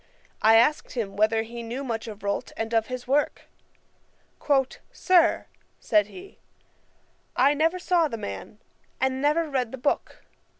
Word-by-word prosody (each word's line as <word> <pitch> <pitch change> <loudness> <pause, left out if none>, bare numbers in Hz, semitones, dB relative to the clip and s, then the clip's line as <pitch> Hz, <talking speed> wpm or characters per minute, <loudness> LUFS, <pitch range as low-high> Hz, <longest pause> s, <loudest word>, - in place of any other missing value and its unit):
I 220 +1 +6
asked 240 +7 +3
him 210 -6 -3
whether 220 +2 +2
he 235 +1 -8
knew 235 +4 -5
much 230 -3 -4
of 210 -2 -9
Rolt, 200 0 -2
and 225 +1 -3
of 225 -1 +2
his 255 -1 -6
work. 285 +3 +1 1.5
'Sir, 355 -3 +3 0.3
(said 210 -2 +2
he) 370 - -13 1.0
I 285 - +4
never 325 +4 +1
saw 350 -2 +2
the 230 - -5
man, 100 - -7 0.4
and 265 0 0
never 305 +3 +2
read 255 -5 -1
the 265 - -6
book. 265 +3 -2
245 Hz, 145 wpm, -25 LUFS, 225-295 Hz, 1.5 s, I